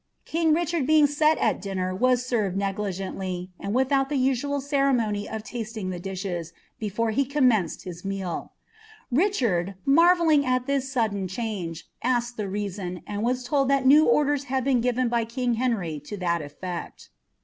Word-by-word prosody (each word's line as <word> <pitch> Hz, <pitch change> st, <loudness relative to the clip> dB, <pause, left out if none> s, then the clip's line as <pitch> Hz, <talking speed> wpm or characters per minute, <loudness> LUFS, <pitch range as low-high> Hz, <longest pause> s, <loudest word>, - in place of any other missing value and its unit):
* -, -, -46 dB
bchard 325 Hz, -2 st, +1 dB
being 310 Hz, 0 st, +5 dB
eet 305 Hz, +2 st, +3 dB
at -, -, +1 dB
dinner 185 Hz, -2 st, -2 dB
was 250 Hz, +5 st, +2 dB
served 210 Hz, -7 st, 0 dB
negligently, 190 Hz, -2 st, -3 dB
and 200 Hz, +3 st, -3 dB
without 270 Hz, +1 st, +2 dB
(■1 275 Hz, 0 st, 0 dB
ceremony 255 Hz, -8 st, +1 dB
of 220 Hz, -1 st, -5 dB
lasting 215 Hz, -5 st, -4 dB
the 180 Hz, -, -5 dB
dishes, 180 Hz, -3 st, -4 dB, 0.3 s
before 220 Hz, +2 st, -1 dB
he 275 Hz, +6 st, +2 dB
commenced 250 Hz, -, +1 dB
his 175 Hz, -2 st, -8 dB
ftichonl, 195 Hz, -3 st, -4 dB, 1.4 s
marvelling 330 Hz, 0 st, +5 dB
at 255 Hz, -1 st, 0 dB
this 275 Hz, -1 st, -1 dB
sudden 215 Hz, -7 st, 0 dB
change, 185 Hz, -5 st, -4 dB
asked 240 Hz, -1 st, 0 dB
the 210 Hz, -3 st, -3 dB
reason, 190 Hz, -3 st, -4 dB
and 205 Hz, 0 st, -4 dB
ll 255 Hz, +4 st, +1 dB
that 275 Hz, 0 st, +2 dB
new 295 Hz, +4 st, +7 dB
orders 290 Hz, -1 st, +2 dB
had 260 Hz, 0 st, -1 dB
been 260 Hz, -2 st, +2 dB
given 250 Hz, +1 st, +1 dB
by 235 Hz, 0 st, +1 dB
king 245 Hz, +2 st, -1 dB
Henry 220 Hz, -11 st, -1 dB
to 150 Hz, +8 st, -8 dB
that 170 Hz, -3 st, 0 dB
efTecl. 170 Hz, +4 st, -7 dB
235 Hz, 150 wpm, -25 LUFS, 195-270 Hz, 1.4 s, new